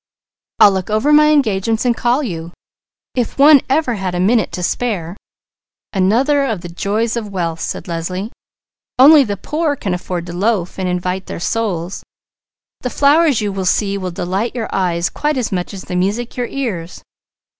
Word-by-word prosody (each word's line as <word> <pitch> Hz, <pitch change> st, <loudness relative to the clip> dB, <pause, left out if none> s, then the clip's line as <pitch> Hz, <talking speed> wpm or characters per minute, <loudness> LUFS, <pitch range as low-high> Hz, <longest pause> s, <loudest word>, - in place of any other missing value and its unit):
"I'll 205 Hz, -, +8 dB
look 190 Hz, 0 st, -3 dB
over 215 Hz, +8 st, +2 dB
my 300 Hz, 0 st, +6 dB
engagements 225 Hz, -6 st, +1 dB
and 240 Hz, -1 st, +2 dB
call 245 Hz, +6 st, +1 dB
you. 170 Hz, -7 st, -5 dB, 0.6 s
If 245 Hz, -3 st, -2 dB
one 285 Hz, 0 st, +7 dB
ever 275 Hz, -2 st, +1 dB
had 190 Hz, -4 st, -3 dB
a -, -, -1 dB
minute 215 Hz, +4 st, +2 dB
to 180 Hz, -, -4 dB
spare!" 185 Hz, -5 st, -2 dB, 0.8 s
"Another 240 Hz, +10 st, +2 dB
of 225 Hz, -9 st, -2 dB
the 175 Hz, -, -8 dB
joys 210 Hz, +7 st, -1 dB
of 225 Hz, -3 st, -4 dB
wealth!" 170 Hz, -4 st, -3 dB
said -, -, -5 dB
Leslie. 180 Hz, +5 st, -4 dB, 0.7 s
"Only 285 Hz, +3 st, +8 dB
the 205 Hz, -5 st, -3 dB
poor 305 Hz, -, -1 dB
can 195 Hz, -8 st, -3 dB
afford 180 Hz, -1 st, -4 dB
to 175 Hz, -, -7 dB
'loaf 190 Hz, -1 st, -1 dB
and 185 Hz, -1 st, -1 dB
invite 180 Hz, +1 st, -2 dB
their -, -, -6 dB
souls.' 190 Hz, -3 st, -2 dB, 0.8 s
The 250 Hz, -, -3 dB
flowers 290 Hz, -2 st, +3 dB
you 205 Hz, -1 st, -1 dB
will 195 Hz, -1 st, -3 dB
see 200 Hz, +2 st, +1 dB
will 185 Hz, -2 st, -3 dB
delight 190 Hz, +7 st, -3 dB
your 230 Hz, -3 st, -4 dB
eyes, 175 Hz, -2 st, 0 dB
quite 300 Hz, -1 st, -2 dB
as 245 Hz, -4 st, -2 dB
much 180 Hz, -2 st, -2 dB
as 195 Hz, -2 st, -8 dB
the 180 Hz, -, -6 dB
music 205 Hz, +7 st, -1 dB
your 245 Hz, -1 st, -2 dB
ears." 195 Hz, -11 st, -5 dB
205 Hz, 175 wpm, -17 LUFS, 180-245 Hz, 0.8 s, I'll